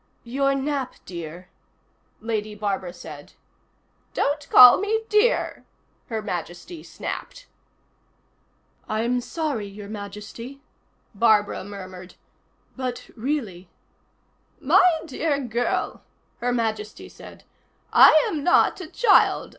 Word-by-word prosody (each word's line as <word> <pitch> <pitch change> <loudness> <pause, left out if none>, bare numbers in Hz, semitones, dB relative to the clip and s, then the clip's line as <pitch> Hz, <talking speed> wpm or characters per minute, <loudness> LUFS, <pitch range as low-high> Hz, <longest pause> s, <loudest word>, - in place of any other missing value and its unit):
"Your 275 +3 0
nap, 275 -1 -2
dear," 170 0 -8 0.7
Lady 215 -1 -3
Barbara 195 -3 -3
said. 155 -4 -11 0.8
"Don't 290 0 -1
call 250 +4 +9
me 440 +3 -1
dear," 425 +4 +1 0.4
Her 220 -2 -4
Majesty 190 - -6
snapped. - - -7 1.4
"I'm 235 +3 0
sorry, 255 -5 -3
Your 200 0 -10
Majesty," 210 +5 -8 0.5
Barbara 210 -2 +2
murmured. 185 -2 -10 0.6
"But 255 -2 -5
really 220 -9 -4 0.5
" - - -41
"My 340 -3 +5
dear 295 0 -1
girl," 240 -2 -2 0.4
Her 245 +1 -1
Majesty 220 -3 -3
said, - - -14 0.5
"I 310 - +7
am 320 -9 -3
not 355 +2 +3
a 350 - -7
child. 415 +4 +3
235 Hz, 100 wpm, -24 LUFS, 205-285 Hz, 1.4 s, call